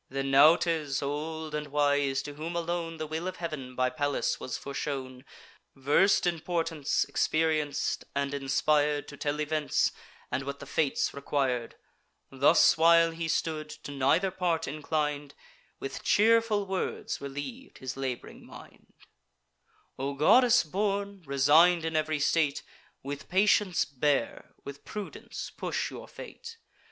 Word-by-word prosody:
Then 135 +1 -2
Nautes, 150 0 +4
old 155 +2 -4
and 150 0 -3
wise, 145 -1 +1
to 145 0 -7
whom 160 +4 -6
alone 170 -1 -3
The 155 - -4
will 160 +3 -4
of 185 - -4
Heav'n 150 -8 -6
by 130 0 +1
Pallas 145 +2 -1
was 130 - -4
foreshown; 135 -2 -5 0.5
Vers'd 145 +11 +3
in 175 -2 0
portents, 165 -3 -1
experienc'd, 155 -3 0
and 140 0 -1
inspir'd 145 +1 +1
To 140 - -9
tell 145 +1 -2
events, 150 0 +1 0.4
and - - -1
what 140 +1 -5
the 140 - -9
fates 145 0 0
requir'd; 135 -4 -2 0.6
Thus 140 +4 +4
while 165 0 +6
he 165 0 -4
stood, 155 -1 -2
to 145 - -9
neither 140 +8 +2
part 175 -3 -1
inclin'd, 150 -1 -2 0.4
With 135 - -6
cheerful 220 -1 +3
words 190 -1 -3
reliev'd 145 - -7
his 130 -1 -6
lab'ring 130 -2 -5
mind: - - -15 1.1
"O 140 +1 -2
goddess 240 - +5
born, 200 +3 -2
resign'd 155 +5 +4
in 160 0 -2
ev'ry 155 -1 0
state, 150 -1 +1 0.4
With 140 +2 -6
patience 195 -1 +3
bear, 145 +1 -1
with 140 0 -9
prudence 210 -2 -7
push - - -3
your - - -9
fate. 460 -1 -10
150 Hz, 135 wpm, -29 LUFS, 140-170 Hz, 1.1 s, while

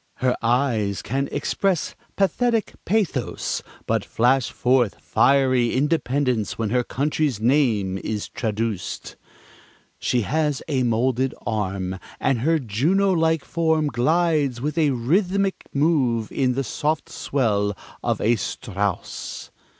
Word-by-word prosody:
"Her 130 -1 +1
eyes 115 -5 +1
can 135 +4 -1
express 190 -5 0 0.2
pathetic 225 +3 +1
pathos, 190 - -1 0.2
but 110 -2 0
flash 125 +5 +2
forth 125 -4 +1
fiery 130 -3 +3
independence 130 -5 0
when 110 -2 -1
her 125 0 +2
country's 145 -2 -1
name 110 -7 +2
is 105 0 -3
traduced."... 110 -4 -3 0.8
"She 125 - +1
has 150 +4 0
a 140 -5 0
molded 125 +2 +1
arm, 95 -3 -2 0.2
and 130 - +1
her 160 +7 +2
Juno 155 - +1
like 160 -3 +1
form 160 -2 +1
glides 150 0 +1
with 150 +4 -2
a 160 -3 +3
rhythmic 185 - 0
move 135 -7 +1
in 130 -2 +1
the 135 +2 -1
soft 155 +6 -1
swell 105 -7 0 0.2
of - - 0
a 115 +2 +2
Strauss."... 100 -5 -4
130 Hz, 120 wpm, -23 LUFS, 115-155 Hz, 0.8 s, fiery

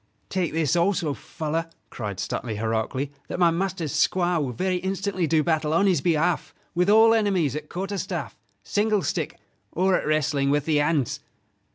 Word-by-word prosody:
"Take 180 -5 -1
this 160 -1 +1
also, 170 -3 +1
fellow," 160 +2 -3 0.3
cried 105 -5 -5
Stuteley, 110 +3 -3
heroically: 115 +6 -2 0.2
"that - - -4
my 175 -2 +4
master's 175 -3 -2
squire 175 -2 +2
will 135 -3 -2
very 185 +8 -1
instantly 190 -1 -1
do 155 0 +3
battle 155 -2 +1
on 170 +5 +3
his 185 -3 +3
behalf 170 0 0 0.2
with 180 +3 +2
all 225 +2 +7
enemies 190 - +1
at 150 0 -6
quarter 195 +2 -3
staff, 175 - -4 0.3
single 210 -2 +1
stick, - - -2 0.3
or 185 +2 +2
at - - -1
wrestling 150 -2 +1
with 145 0 +1
the 155 -2 +2
hands." 145 -3 +1
165 Hz, 170 wpm, -25 LUFS, 150-190 Hz, 0.3 s, all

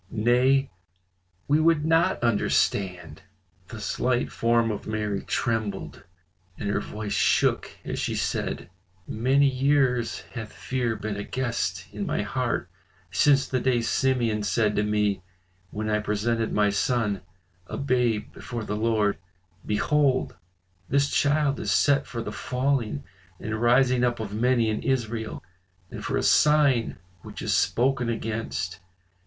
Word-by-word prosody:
Nay! 125 +4 +2 0.8
we 150 +2 +3
would 160 -2 +3
not 165 0 +2
understand." 95 -6 0 0.5
The 110 +2 -8
slight 120 +4 -1
form 115 -1 +2
of 105 - -6
Mary 105 -2 -2
trembled 110 -4 -3 0.5
and 105 - -4
her - - +1
voice 105 0 -5
shook - - +2 0.2
as - - -3
she - - -1
said, 85 - -2 0.4
"Many 135 +5 +3
years 130 -3 +1
hath 115 -3 -6
fear 125 -3 -2
been 110 -2 -4
a 100 - -3
guest 120 -1 -2
in - - -4
my - - -1
heart - - -2 0.4
since 140 -2 +4
the 130 - 0
day 125 -1 +2
Simeon 115 -3 +1
said 105 +1 +1
to - - +2
me 105 -2 0 0.5
when 105 +3 -4
I 105 0 +1
presented 110 +2 -1
my 105 -1 +2
son 105 -2 0 0.5
a - - -5
babe 125 -5 0
before 120 -2 -6
the 105 - -3
Lord, 110 -2 +1 0.4
'Behold, 135 +5 +1 0.5
this 140 +1 +2
child 145 -1 +2
is - - -2
set 140 -1 +3
for 115 -2 -5
the 105 - -5
falling 125 - -1 0.4
and 110 0 -4
rising 125 +1 +4
up 120 -1 +1
of 105 -2 -5
many 120 +1 +2
in 110 0 -1
Israel, 115 -6 -2 0.5
and - - -7
for - - -1
a - - 0
sign 145 -6 +4 0.2
which - - -9
is - - 0
spoken 125 0 +1
against. 105 -7 -3
115 Hz, 140 wpm, -26 LUFS, 105-130 Hz, 0.8 s, since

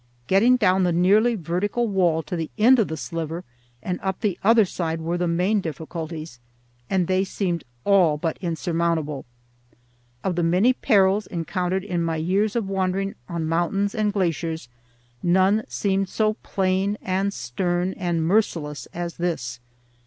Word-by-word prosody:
Getting 215 - +4
down 190 -5 +3
the 180 - +2
nearly 205 +7 +4
vertical 200 +6 -1
wall 175 -5 +2
to 180 - -5
the 165 -2 -3
end 245 +4 +6
of 220 - +2
the 160 - -4
sliver 165 +2 -4 0.4
and 180 -1 -2
up 190 -1 -3
the 205 -6 +1
other 225 +1 +6
side 165 -3 -3
were 165 +2 -2
the 175 0 0
main 180 +5 +1
difficulties, 160 -3 -6 0.5
and 185 -2 +2
they 185 +2 +2
seemed 185 -3 -2 0.2
all 180 -7 +4
but 160 +2 -3
insurmountable. 165 -4 -1 1.0
Of 185 -2 -1
the 175 - 0
many 180 +9 +3
perils 205 -5 +3
encountered 180 +2 -2
in 180 -4 -2
my 165 -1 0
years 195 +7 0
of 225 -4 0
wandering 195 0 -1 0.2
on 170 -2 -2
mountains 175 +5 0
and 215 -3 +1
glaciers 165 -7 -2 0.5
none 190 +4 +3
seemed 195 -1 -1
so 215 -1 +1
plain 190 +2 0
and 190 +2 0
stern 175 +5 -2
and 170 -3 -1
merciless 165 -6 0
as 170 0 -4
this. 165 -9 -2
180 Hz, 155 wpm, -24 LUFS, 165-200 Hz, 1.0 s, end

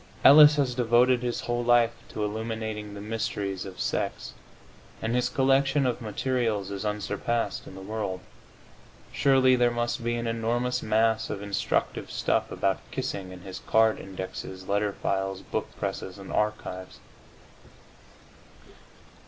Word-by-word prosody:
Ellis 150 +1 +10
has 135 -4 +1
devoted 120 +1 +3
his 120 -1 -2
whole 120 0 -1
life 120 -1 +4 0.2
to 105 - -4
illuminating 110 -1 -4
the 100 - -7
mysteries 105 -3 -3
of 95 - -10
sex, - - -2 0.7
and 110 +1 -2
his 125 0 +1
collection 135 +1 +3
of 125 -1 -1
materials 110 -3 -1
is 100 0 -4
unsurpassed 105 +1 -2
in 95 - -10
the 95 - -9
world. 105 -2 -3 0.9
Surely 130 -2 +4
there 120 -1 +3
must 120 0 -2
be 120 0 0
an 120 0 -3
enormous 120 +2 -1
mass 110 +1 +2
of 100 -1 -4
instructive 100 -1 -1
stuff - - 0
about - - 0
kissing 95 -2 -4
in 90 -1 -10
his 95 0 -8
card 110 0 +3
indexes, 95 0 -7
letter 100 0 +1
files, 95 0 -2
book - - -3
presses 95 0 -4
and 95 -1 -8
archives. 105 -3 -2
110 Hz, 135 wpm, -27 LUFS, 100-120 Hz, 0.9 s, Ellis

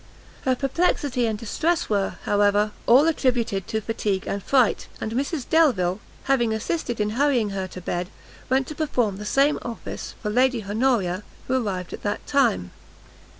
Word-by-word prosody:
Her 260 -1 +3
perplexity 275 -3 0
and 220 -1 -1
distress 325 +10 0
were, 200 -2 0
however, 205 +1 +2 0.2
all 265 +7 +6
attributed 240 - 0
to 220 - -1
fatigue 205 -3 -2
and 200 - -3
fright; 255 +1 +2
and 220 - -3
Mrs 275 +3 -2
Delvile, 215 - +3 0.2
having 240 -5 +2
assisted 240 +1 -2
in 210 0 0
hurrying 245 -4 +2
her 190 -1 -3
to 185 - -9
bed, 175 +1 -3 0.4
went 265 +1 +2
to 305 - -7
perform 250 -10 0
the 210 - -7
same 275 +7 +3
office 235 -2 -6
for 210 - -3
Lady 250 0 +2
Honoria, 210 -4 +1 0.3
who 260 - 0
arrived 180 -2 -4
at - - -7
that 205 - -3
time. 95 - +1
230 Hz, 160 wpm, -24 LUFS, 205-270 Hz, 0.4 s, all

